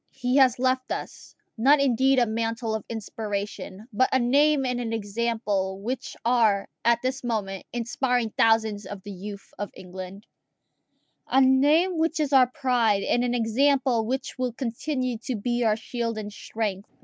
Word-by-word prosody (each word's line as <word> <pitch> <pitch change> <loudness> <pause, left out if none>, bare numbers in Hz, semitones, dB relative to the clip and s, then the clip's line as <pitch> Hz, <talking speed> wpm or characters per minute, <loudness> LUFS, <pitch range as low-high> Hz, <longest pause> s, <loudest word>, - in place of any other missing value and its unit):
He 255 0 -1
has 260 -3 +5
left 255 0 0
us, - - -6 0.2
not 280 +5 +5
indeed 265 0 +3
a 245 - +4
mantle 225 0 -2
of 220 -2 -3
inspiration, 205 -2 -5
but 255 +5 +3
a - - +4
name 275 +3 +3
and 250 -1 -1
an 230 -2 -3
example 205 -3 -2
which 245 +6 -5
are 225 -5 +3 0.2
at 235 0 +4
this 260 +1 -2
moment 205 -5 -3
inspiring 240 0 -1
thousands 220 -3 +2
of 195 -1 -8
the 205 - -8
youth 200 +1 -9
of 205 - -3
England 185 +2 -9 1.0
a 265 - +3
name 295 +7 +4
which 325 0 0
is 295 -2 0
our 260 -2 +7
pride, 245 -6 +1
and 240 - +1
an 245 0 0
example 245 0 +2
which 260 +1 -3
will 250 -2 -1
continue 255 0 -3
to 245 +2 -4
be 240 +3 -1
our 220 -2 +3
shield 230 0 -3
and 210 -1 -6
strength. 205 -2 -4
235 Hz, 160 wpm, -25 LUFS, 215-260 Hz, 1.0 s, our